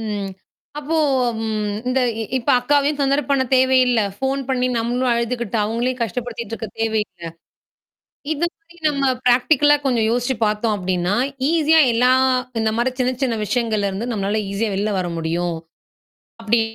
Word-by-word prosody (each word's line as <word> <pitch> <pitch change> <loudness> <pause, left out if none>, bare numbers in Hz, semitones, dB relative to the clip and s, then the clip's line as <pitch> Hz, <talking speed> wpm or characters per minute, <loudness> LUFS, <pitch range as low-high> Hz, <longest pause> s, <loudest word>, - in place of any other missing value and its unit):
ம். 205 -3 -3 0.5
அப்போ 305 +3 -2 0.5
ம் 215 -1 -2 0.2
இந்த 260 +1 +1 0.2
இ - - -1 0.2
இப்ப 235 - -1
அக்காவையும் 290 +2 +1
தொந்தர 275 +1 +2
பண்ண 275 -1 +3
தேவையில்ல. 255 -2 +4 0.2
ஃபோன் 270 +3 -1
பண்ணீ 255 -1 +1
நம்மளும் 245 +2 0
அழுதுக்கிட்டு, 235 -1 -2
அவுங்களையும் 240 +4 -2
கஷ்டப்படுத்திட்டு 235 0 -4
இருக்க 225 -1 -6
தேவையில்ல. 215 -5 -2 1.1
இது 315 +3 0
மாரி 345 -4 -23
நம்ம 280 -2 -1 0.2
பிராக்டிகலா 290 +4 +4
கொஞ்சம் 240 -5 +1
யோசிச்சு 245 +2 0
பாத்தோம் 210 +1 0
அப்டின்னா, 180 0 -1 0.4
ஈஸியா 320 -1 +4
எல்லா 250 +2 +3 0.5
இந்த 220 0 +1
மாரி 245 +2 +1
சின்ன 255 0 +2
சின்ன 235 -4 0
விஷயங்கள்ல 220 -3 0
இருந்து 220 +6 -4
நம்மளால 205 0 -1
ஈஸியா 210 +2 -1
வெளில 205 +2 -1
வர 180 -1 -2
முடியும். 170 +1 -2 0.9
அப்டி 225 +1 +2
235 Hz, 145 wpm, -20 LUFS, 215-260 Hz, 1.1 s, தேவையில்ல